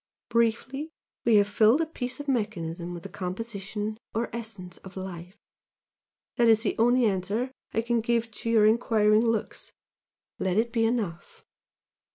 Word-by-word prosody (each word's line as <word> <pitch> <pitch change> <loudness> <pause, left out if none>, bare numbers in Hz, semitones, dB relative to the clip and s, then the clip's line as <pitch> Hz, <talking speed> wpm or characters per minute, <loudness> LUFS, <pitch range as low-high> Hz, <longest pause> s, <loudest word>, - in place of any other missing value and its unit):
Briefly 235 +6 0 0.4
we 230 -2 +5
have 205 -1 +5
filled 215 +6 +4
a 330 - +2
piece 255 -4 -5
of 290 - -7
mechanism 175 -9 -2
with 175 -1 -7
the - - -6
composition 205 +2 -4 0.2
or 230 +1 -2
essence 205 -6 -7
of 190 0 -12
Life! 185 0 -7 1.0
that 235 -1 +5
is 225 0 +5
the - - 0
only 245 +2 +4
answer 205 +5 0 0.2
I 225 - 0
can 235 0 +1
give 230 0 0
to 230 +2 -5
your 220 -2 +5
enquiring 215 -1 +4
looks! 225 -2 -2 0.7
let 190 0 0
it 230 +1 +1
be 225 -1 +2
enough!" 215 -8 -3
220 Hz, 155 wpm, -27 LUFS, 195-235 Hz, 1.0 s, we